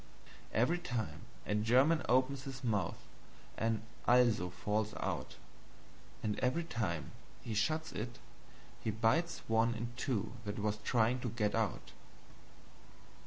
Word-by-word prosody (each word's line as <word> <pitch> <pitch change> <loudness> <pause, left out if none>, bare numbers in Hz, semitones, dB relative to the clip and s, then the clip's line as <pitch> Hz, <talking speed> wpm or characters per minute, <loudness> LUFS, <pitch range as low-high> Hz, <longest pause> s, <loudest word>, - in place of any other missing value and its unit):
Every 155 +10 +2
time 125 -10 -3 0.2
a - - 0
German 130 +9 +4
opens 130 +1 +3
his 135 -1 -7
mouth 105 -8 0 0.6
an 110 -1 0 0.2
ALSO 120 -7 +5
falls 105 +4 -1
out; 85 -9 -3 0.9
and 105 -1 -1
every 130 +7 +1
time 105 - -2 0.3
he 115 - -4
shuts 155 +9 +1
it 120 +2 -4 0.6
he - - -2
bites 115 +11 +1
one 115 +1 +3
in 115 +1 -4
two 110 -6 -1
that 105 -1 -4
was 105 0 0
trying 120 +3 +2
to 125 - -2
GET 105 -2 0
out. 110 -4 -1
115 Hz, 125 wpm, -35 LUFS, 105-125 Hz, 0.9 s, ALSO